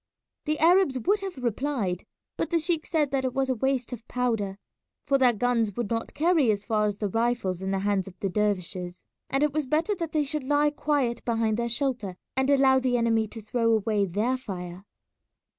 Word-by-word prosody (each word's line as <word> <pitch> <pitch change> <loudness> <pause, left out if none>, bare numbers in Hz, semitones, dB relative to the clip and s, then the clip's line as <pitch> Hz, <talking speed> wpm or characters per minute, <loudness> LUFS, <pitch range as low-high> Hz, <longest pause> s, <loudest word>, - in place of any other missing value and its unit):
The 305 0 0
Arabs 340 -3 +4
would 400 - +1
have 385 -4 -6
replied, 235 -6 -2 0.3
but - - -2
the 340 - +2
sheik 330 0 -1
said 300 -4 +1
that 270 -1 0
it 255 -1 -2
was 270 0 0
a - - +3
waste 255 0 -1
of 230 -1 -9
powder, 225 -6 -1 0.5
for 280 -1 +2
their 255 -2 +6
guns 230 -2 0
would 235 -3 -3
not 230 0 -3
carry 320 -5 +3
as 205 -1 -2
far 215 -2 +1
as 205 -1 -3
the 210 - -1
rifles 225 -4 -1
in 190 - -3
the 195 - 0
hands 195 -1 0
of 185 -1 -12
the 195 - -1
dervishes, 185 -3 -2 0.2
and 270 +2 +1
it 300 -2 +1
was 305 -3 -1
better 320 +9 +1
that 335 -5 -4
they 305 -1 +1
should 290 0 -3
lie 290 +2 +2
quiet 285 -5 -1
behind 225 -2 +1
their 235 0 -1
shelter 240 -7 -2 0.2
and 265 +1 +1
allow 270 -1 +5
the 250 -1 +1
enemy 225 -2 +2
to 225 +1 -10
throw 230 +1 +1
away 210 -2 +1
their 215 +8 0
fire. 180 -5 -7
245 Hz, 210 wpm, -27 LUFS, 210-280 Hz, 0.5 s, their